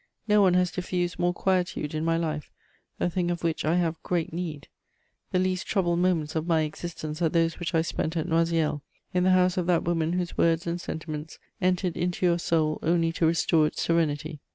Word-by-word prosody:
No 210 -1 +5
one 185 -2 +4
has 180 -1 +2
diffused 180 -1 -2
more 175 0 +2
quietude 180 -5 -1
in 155 0 -2
my 165 0 +2
life, 155 -3 -3 0.5
a - - +1
thing 175 0 -1
of 175 -1 -3
which 165 -1 0
I 155 +3 +2
have 170 -2 0
great 170 -3 -2
need. 165 -4 -5 0.6
The - - +1
least 185 0 0
troubled 175 -4 +1
moments 170 -4 +1
of 160 +1 -1
my 165 -2 +3
existence 155 0 -5
are 165 - +3
those 165 0 +1
which 175 0 -2
I 160 - +3
spent 165 0 -2
at 160 +1 -1
Noisiel, 165 -3 +1 0.3
in 180 0 +2
the - - +4
house 185 0 +3
of 180 -2 0
that 175 -2 +3
woman 165 -1 0
whose 180 -1 -2
words 165 0 +3
and 170 +1 -2
sentiments 155 -2 -6 0.2
entered 180 -1 +1
into 180 +1 -1
your 175 -1 +3
soul 155 -2 +1
only 165 0 +2
to 165 0 +1
restore 160 -1 +3
its - - -3
serenity. 155 -2 0
170 Hz, 205 wpm, -27 LUFS, 160-180 Hz, 0.6 s, No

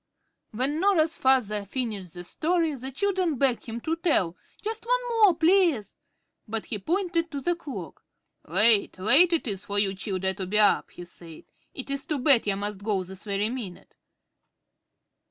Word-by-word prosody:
When 265 +7 -1
Norah's 335 -4 +2
father 235 -6 +2
finished 200 -5 -5
the 175 - -7
story, 330 - 0
the 265 -1 -6
children 365 +2 0
begged 250 -4 +1
him 230 +1 -5
to 320 +5 -1
tell 285 - +1 0.3
"just 440 +1 -3
one - - +3
more, 425 -6 +5
plaze." 330 - +2 0.5
But 220 0 -4
he 210 - -4
pointed 340 - -1
to 285 - -5
the 350 +6 0
clock. 310 -5 -9 0.4
"Late, 215 -3 +3
late 280 - +5
it 330 -6 0
is 200 -2 -3
for 205 0 -4
you 200 -1 +2
childer 190 -1 -2
to 190 -1 -5
be 210 +3 0
up," 210 -1 +3
he 175 - -10
said. 170 -2 -12 0.3
"It 270 0 -6
is 275 0 -3
to 305 - -2
bed 260 -4 +4
ye 200 - +1
must 205 0 -4
go 200 -3 0
this 190 +2 -9
very 205 +2 -1
minute." 225 -9 -7
250 Hz, 170 wpm, -26 LUFS, 200-330 Hz, 0.5 s, more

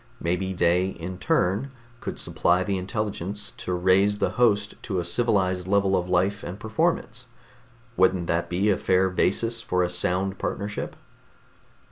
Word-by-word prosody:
Maybe 90 +3 -1
they 90 0 +2
in 90 0 -6
turn 135 - +1 0.3
could - - -5
supply 90 +1 +1
the 100 -1 -1
intelligence 105 0 -3
to - - -5
raise 95 +3 +3
the - - 0
host 105 -4 +2
to 95 -4 -2
a - - -1
civilized 95 -2 +1
level 100 -1 +2
of 90 0 -1
life 95 +3 +1
and 90 +4 -6
performance. 120 0 -1 0.7
Wouldn't 95 -1 +3
that 85 +1 -1
be 95 +4 +2
a 95 - 0
fair 95 0 +2
basis 115 +5 0
for 90 -5 0
a 90 - -1
sound 90 +2 0
partnership?" 105 +1 -4
95 Hz, 150 wpm, -25 LUFS, 90-105 Hz, 0.7 s, raise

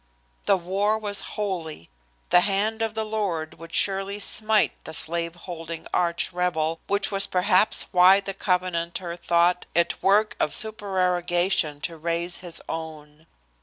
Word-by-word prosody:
The 200 - +4
war 195 +4 0
was 205 -2 0 0.2
holy. 175 - -4 0.4
The 180 - +7
hand 210 +3 0
of 225 -1 -2
the 220 0 -2
Lord 190 -9 -3
would 165 0 -11
surely 195 +2 +1
smite 215 +1 +4
the 160 - -4
slave 170 +1 +1
holding 165 -2 -8
arch 170 +1 0
rebel, 165 -2 -1
which 200 0 0
was 195 0 0
perhaps 185 +2 +3
why 185 +1 +6
the 195 0 -6
Covenanter 180 -2 -2
thought 175 +1 +1
it 170 0 +1
work 205 +3 +3
of 150 - 0
supererogation 180 -7 0
to 165 +1 -5
raise 170 +2 -2
his 175 -2 -6
own. 155 -1 -8
180 Hz, 140 wpm, -24 LUFS, 170-200 Hz, 0.4 s, The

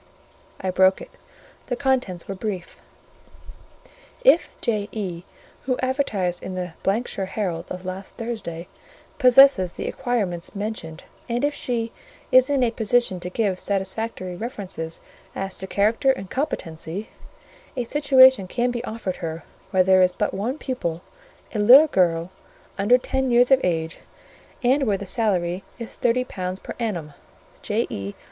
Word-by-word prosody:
I 190 - -2
broke 190 +1 +4
it; - - -11 0.6
the 245 - -1
contents 250 -9 -1
were 195 - -3
brief. 195 -2 -5 1.4
"If 345 -9 +5
J.E., 205 -5 -2 0.5
who 255 -1 +1
advertised 215 -10 -1
in 185 - -6
the 180 -2 -4 0.3
——shire 195 -5 -4
Herald 180 -5 -3
of 180 0 -6
last 185 +1 -6
Thursday, 210 -8 -5 0.5
possesses 250 -8 +6
the - - -5
acquirements 210 -9 -2
mentioned, 200 -6 -5 0.3
and 240 +4 +1
if 290 - 0
she 230 -4 -2 0.4
is 255 +1 +6
in 275 -3 +2
a 235 - +2
position 225 -3 +1
to 180 - -5
give 195 -2 -1
satisfactory 195 -1 -2
references 190 -7 -6 0.3
as 195 0 -4
to 190 - -5
character 215 +7 +2
and 195 -7 -6
competency, 195 - -4 0.7
a 250 - 0
situation 260 -5 +5
can 245 +5 0
be 240 0 -4
offered 220 -6 -4
her 165 -1 -5 0.3
where 185 -1 +3
there 190 0 +5
is 185 0 +4
but 210 +3 -2
one 230 +9 -2
pupil, 175 - -4 0.5
a 215 - -2
little 250 +9 +9
girl, 175 - +1 0.4
under 210 +6 +4
ten 265 +1 -1
years 245 +2 +4
of 265 -1 +6
age; 165 -2 -1 0.6
and 260 +4 +3
where 200 -2 +2
the 200 - -7
salary 190 -3 0
is 230 -1 -7
thirty 245 +1 +1
pounds 185 -5 -5
per - - -7
annum. 175 -10 -3 0.5
J.E. 100 0 -2
205 Hz, 145 wpm, -23 LUFS, 180-245 Hz, 1.4 s, little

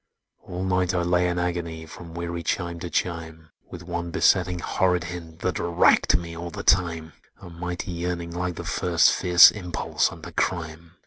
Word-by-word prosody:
"All 90 +1 -6
night 90 -1 0
I 90 - +1
lay 90 +1 +2
in 90 - -2
agony, 85 -2 -3
From 85 +1 -11
weary 85 0 -4
chime 85 +1 -2
to 85 - -6
chime, 80 -1 -4 0.2
With 90 - -9
one 85 0 -4
besetting 90 +1 +2
horrid 90 +1 0
hint, 85 -2 -8
That 90 -2 -1
racked 85 -1 +3
me 85 -1 -7
all 85 +1 -6
the 85 - -7
time; 80 -4 +1 0.3
A 90 -3 -11
mighty 90 +1 -5
yearning, 85 0 -4
like 90 0 -3
the - - -6
first 85 -3 +3
Fierce 90 -1 +7
impulse 90 -5 -1
unto - - -10
crime! 85 -1 -3
85 Hz, 175 wpm, -24 LUFS, 85-90 Hz, 0.3 s, Fierce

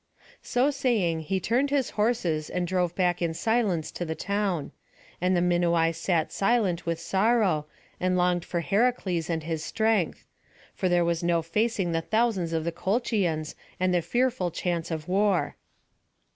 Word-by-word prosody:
So 255 +4 +1
saying, 230 - +1
he 190 -1 +1
turned 245 +9 +1
his 275 -3 0
horses 195 -9 0
and 180 -1 -1
drove 180 -1 0
back 180 -2 +1
in 165 -1 -1
silence 210 -7 0
to - - -4
the 160 -1 -3
town. 200 -5 -2 0.5
And 180 0 +2
the - - +2
Minuai 170 -2 +2
sat 165 -1 0
silent 195 -6 +1
with 165 -1 -1
sorrow, 190 -4 +1 0.3
and 185 0 +1
longed 180 -1 +2
for 170 -1 -2
Heracles 195 - 0
and 165 -2 -1
his 160 -1 -3
strength; 220 -2 0 0.5
for 185 - -1
there 175 -1 +3
was 170 -1 0
no 170 -1 +1
facing 200 +1 0
the 165 0 0
thousands 215 -4 0
of 160 -1 -1
the 170 - -1
Colchians, 185 -4 -1 0.3
and 185 0 +2
the 175 - +2
fearful 240 +1 0
chance 170 0 -2
of 160 -2 -4
war. 195 0 +1
180 Hz, 160 wpm, -27 LUFS, 165-210 Hz, 0.5 s, there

